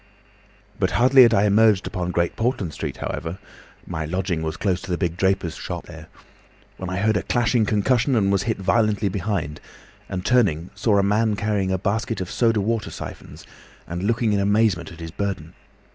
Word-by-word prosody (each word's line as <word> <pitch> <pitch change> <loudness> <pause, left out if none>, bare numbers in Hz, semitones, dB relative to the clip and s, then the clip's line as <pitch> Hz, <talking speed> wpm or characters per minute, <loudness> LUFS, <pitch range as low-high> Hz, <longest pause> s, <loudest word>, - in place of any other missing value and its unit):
"But - - +2
hardly 130 +2 +6
had 120 -2 +7
I 100 - +3
emerged 105 -1 +4
upon 90 -3 -3
Great 85 -1 0
Portland 110 - -1
Street, - - -5
however 85 +3 -4 0.5
(my 80 - -4
lodging 90 +1 -2
was 80 0 -3
close 95 -3 0
to 100 - -10
the 90 - 0
big 85 -3 -1
draper's 95 -2 0
shop - - -6
there), - - -11 0.7
when 95 - -5
I 95 - -3
heard 110 +1 +2
a - - 0
clashing 115 +2 +1
concussion 120 +5 +2
and 100 -3 +2
was 100 -2 +2
hit 110 +2 -1
violently 105 +1 +1
behind, 90 -6 -3 0.5
and 90 -1 -4
turning 95 -10 +2
saw 100 +1 +1
a 100 - +3
man 105 +2 +2
carrying 100 -2 -1
a 95 - +1
basket 110 +3 -2
of 95 - -5
soda 115 -3 +2
water 110 +1 -1
syphons, - - -9 0.4
and 85 +1 -5
looking 115 +1 +1
in 100 - +2
amazement 100 -4 +1
at 85 0 -12
his 80 -1 -6
burden. 90 -4 -4
100 Hz, 190 wpm, -23 LUFS, 90-110 Hz, 0.7 s, had